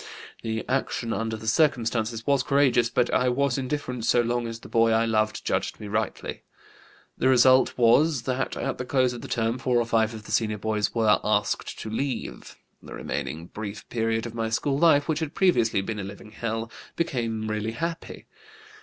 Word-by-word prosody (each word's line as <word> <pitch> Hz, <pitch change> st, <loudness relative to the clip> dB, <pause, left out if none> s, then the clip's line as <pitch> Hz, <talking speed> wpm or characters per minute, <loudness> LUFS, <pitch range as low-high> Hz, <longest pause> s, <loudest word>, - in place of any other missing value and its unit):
The 110 Hz, 0 st, -3 dB
action 125 Hz, -3 st, -1 dB
under 110 Hz, 0 st, -2 dB
the 110 Hz, -, -10 dB
circumstances 115 Hz, -4 st, +1 dB
was 140 Hz, -2 st, +3 dB
courageous, 135 Hz, -4 st, +3 dB
but 125 Hz, 0 st, +1 dB
I 125 Hz, -, +3 dB
was 135 Hz, +1 st, +1 dB
indifferent 130 Hz, -3 st, -3 dB
so 120 Hz, +1 st, +4 dB
long 120 Hz, 0 st, -1 dB
as 115 Hz, 0 st, -6 dB
the -, -, -11 dB
boy 115 Hz, 0 st, +3 dB
I 115 Hz, 0 st, +3 dB
loved 110 Hz, -1 st, 0 dB
judged -, -, -1 dB
me 105 Hz, -, -7 dB
rightly. 105 Hz, +1 st, -3 dB, 0.8 s
The -, -, +2 dB
result 130 Hz, 0 st, +5 dB
was 130 Hz, +3 st, +4 dB
that 130 Hz, +1 st, -2 dB
at -, -, -3 dB
the 125 Hz, -, -3 dB
close 130 Hz, -1 st, +2 dB
of 120 Hz, -, -7 dB
the -, -, -7 dB
term 115 Hz, +1 st, -1 dB
four 125 Hz, -1 st, +1 dB
or 120 Hz, -, +2 dB
five 110 Hz, -1 st, +1 dB
of 110 Hz, -, -9 dB
the -, -, -10 dB
senior 110 Hz, -2 st, +1 dB
boys 105 Hz, 0 st, -1 dB
were 110 Hz, -2 st, +4 dB
'asked 105 Hz, -1 st, 0 dB
to 110 Hz, -, -5 dB
leave.' 130 Hz, +2 st, -4 dB, 0.3 s
The -, -, -9 dB
remaining 80 Hz, +3 st, -4 dB
brief 105 Hz, +2 st, -7 dB
period 115 Hz, -1 st, -1 dB
of 120 Hz, -, -6 dB
my 115 Hz, -1 st, -2 dB
school 135 Hz, +5 st, 0 dB
life, 155 Hz, -3 st, +4 dB
which 155 Hz, -2 st, 0 dB
had 160 Hz, -2 st, -4 dB
previously 120 Hz, -, +3 dB
been 105 Hz, +2 st, -4 dB
a -, -, -3 dB
living 100 Hz, +2 st, -9 dB
hell, 115 Hz, +1 st, -4 dB, 0.2 s
became 115 Hz, -9 st, -2 dB
really 110 Hz, +1 st, -2 dB
happy. 165 Hz, +6 st, -5 dB
115 Hz, 190 wpm, -26 LUFS, 110-130 Hz, 0.8 s, result